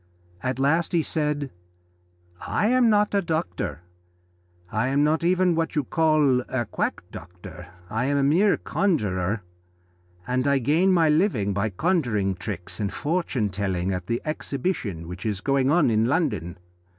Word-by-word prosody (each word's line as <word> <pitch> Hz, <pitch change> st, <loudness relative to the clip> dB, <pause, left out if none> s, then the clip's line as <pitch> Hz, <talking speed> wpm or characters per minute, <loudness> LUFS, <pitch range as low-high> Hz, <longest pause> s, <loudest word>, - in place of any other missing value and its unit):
At 130 Hz, +3 st, -2 dB
last 160 Hz, +6 st, +1 dB
he 165 Hz, -2 st, +3 dB
said: 150 Hz, -3 st, -2 dB, 1.0 s
"I -, -, 0 dB
am 250 Hz, -1 st, +4 dB
not 210 Hz, -1 st, +2 dB
a 200 Hz, -, +3 dB
doctor, 160 Hz, -, -3 dB, 0.9 s
I 110 Hz, +4 st, 0 dB
am 140 Hz, +2 st, +2 dB
not 155 Hz, +2 st, +1 dB
even 180 Hz, 0 st, +3 dB
what 165 Hz, 0 st, -1 dB
you 150 Hz, -, +1 dB
call 155 Hz, -4 st, +3 dB
a 125 Hz, -2 st, -1 dB
quack -, -, -3 dB
doctor 90 Hz, +1 st, -11 dB, 0.2 s
I 110 Hz, +5 st, -2 dB
am 140 Hz, +1 st, +1 dB
a 140 Hz, -, +2 dB
mere 175 Hz, +9 st, +3 dB
conjurer, 105 Hz, -, -1 dB, 0.8 s
and 130 Hz, +2 st, 0 dB
I 140 Hz, 0 st, +3 dB
gain 155 Hz, +9 st, +2 dB
my 170 Hz, -3 st, +4 dB
living 150 Hz, -, +2 dB
by 100 Hz, +3 st, 0 dB
conjuring 110 Hz, -, 0 dB
tricks 95 Hz, 0 st, -6 dB
and 100 Hz, -2 st, -1 dB
fortune 145 Hz, -, -1 dB
telling 95 Hz, -1 st, -1 dB
at 90 Hz, -1 st, -5 dB
the 120 Hz, +1 st, -2 dB
Exhibition 135 Hz, -, -3 dB
which 90 Hz, +2 st, -8 dB
is 105 Hz, -3 st, -2 dB
going 135 Hz, +3 st, +1 dB
on 155 Hz, -5 st, +3 dB
in 110 Hz, 0 st, +2 dB
London. 110 Hz, -, -1 dB
135 Hz, 155 wpm, -24 LUFS, 100-165 Hz, 1.0 s, am